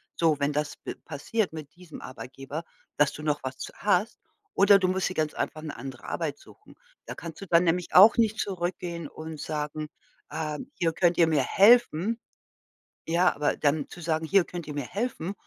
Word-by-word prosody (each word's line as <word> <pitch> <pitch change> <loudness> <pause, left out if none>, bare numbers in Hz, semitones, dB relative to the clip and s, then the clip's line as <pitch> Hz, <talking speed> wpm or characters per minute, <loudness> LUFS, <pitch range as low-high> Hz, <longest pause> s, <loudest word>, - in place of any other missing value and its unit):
So, 160 -3 +2
wenn 140 +1 +1
das 150 0 -2
pe - - -7
passiert 170 +6 -2
mit 150 -2 -9
diesem 175 -3 -12
Arbeitgeber, 135 +4 -7 0.3
dass 150 0 +3
du - - -8
noch 150 -1 0
was 130 0 -5
z - - -7
hast. 205 +1 +1 0.4
Oder 200 0 +6
du 185 - +1
musst 185 0 0
dir - - -5
ganz 155 -3 -1
einfach 155 - -3
'ne 155 -2 -7
andere 135 -2 -8
Arbeit 155 -4 -3
suchen. 425 - -18 0.3
Da - - -6
kannst 165 -2 -9
du 195 - -7
dann 170 0 +4
nämlich 175 +1 0
auch 205 +5 +8
nicht 220 -1 +2
zurückgehen 175 -3 -3
und 155 0 -8
sagen: 150 0 -4 0.4
„Ähm, 155 - -4
hier, 165 -2 0
könnt 175 +1 +2
ihr 165 - +6
mir 150 -4 +2
helfen?“ 220 - +4 0.9
Ja, 175 +2 +2
aber 145 0 0
dann 145 0 0
zu - - -11
sagen: 160 -1 -1
„Hier 190 +2 +4
könnt 175 -2 -7
ihr 150 - -6
mir 145 -2 -3
helfen?“, 200 -3 -3
165 Hz, 195 wpm, -27 LUFS, 150-185 Hz, 0.9 s, auch